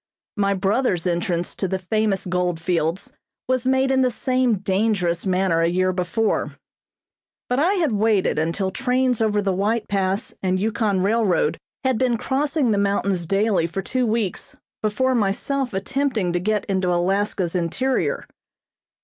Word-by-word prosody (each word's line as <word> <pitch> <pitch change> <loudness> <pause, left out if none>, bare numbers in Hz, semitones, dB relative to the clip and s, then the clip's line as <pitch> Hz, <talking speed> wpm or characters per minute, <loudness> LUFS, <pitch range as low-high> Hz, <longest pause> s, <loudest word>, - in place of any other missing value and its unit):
My 200 -1 +1
brother's 195 -2 0
entrance 175 0 -1
to 190 - -2
the 190 - -1
famous 200 +1 -1
gold 180 -2 -1
fields 170 +2 -1 0.4
was 255 0 0
made 265 0 +2
in 265 0 +3
the 255 - +3
same 255 -1 +1
dangerous 190 -3 0
manner 185 -2 +2
a 165 - +3
year 185 +2 +1
before; 180 +5 -1 0.9
but 250 +2 0
I 350 +7 +3
had 335 -9 +1
waited 210 -6 +2
until 170 +4 -1
trains 255 0 0
over 210 -2 +1
the 195 -1 +1
White 210 +5 0
Pass 195 +2 -1
and 185 0 0
Yukon 210 -2 0
Railroad 220 - +1 0.2
had 260 -3 +1
been 250 -2 +2
crossing 275 0 0
the 205 - +2
mountains 200 -3 0
daily 195 -2 +2
for 190 +3 -4
two 255 -2 0
weeks 215 -4 -2 0.3
before 260 +5 +1
myself 245 +5 0
attempting 215 -2 -1
to 175 - +1
get 210 +3 0
into 190 -2 0
Alaska's 185 0 0
interior. 190 +10 -1
200 Hz, 150 wpm, -22 LUFS, 185-245 Hz, 0.9 s, in